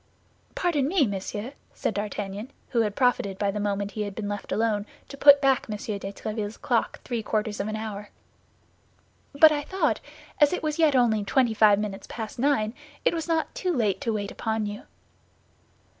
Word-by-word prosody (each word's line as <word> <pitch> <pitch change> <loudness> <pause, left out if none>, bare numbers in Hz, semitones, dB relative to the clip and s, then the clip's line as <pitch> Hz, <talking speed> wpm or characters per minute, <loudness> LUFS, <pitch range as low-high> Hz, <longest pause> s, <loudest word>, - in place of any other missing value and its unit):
"Pardon 300 -7 +1
me, 325 -3 +3
monsieur," 205 +4 -4 0.2
said - - -1
D'Artagnan, 205 +2 -4 0.2
who 235 - +2
had 210 -2 -1
profited 245 -7 +1
by 200 0 0
the 210 - -4
moment 200 0 -1
he 215 - -4
had 205 -2 -4
been 215 -2 -4
left 205 0 -5
alone 215 -2 0 0.2
to - - -8
put 285 0 +8
back 270 -2 +2
M. 210 - -2
de - - -10 0.3
Tréville's 215 +1 -5
clock - - 0
three 240 -3 -2
quarters 215 -1 -2
of 200 - -1
an 215 - -3
hour, 210 -2 -5 1.2
"but 310 +2 +7
I 295 -1 0
thought, 380 +6 0 0.4
as 295 +2 +5
it 360 - -2
was 305 0 -2
yet 310 -4 +4
only 225 -4 +3
twenty 240 +3 +2
five 210 -2 +5
minutes 205 -2 -4
past 220 0 -6
nine, 235 -5 +2 0.3
it - - +4
was 325 -1 -3
not 325 -1 0
too 365 - -1
late 225 - 0
to 240 -5 0
wait 205 -2 -3
upon 220 -1 -2
you." 205 0 -6
220 Hz, 190 wpm, -26 LUFS, 205-275 Hz, 1.2 s, put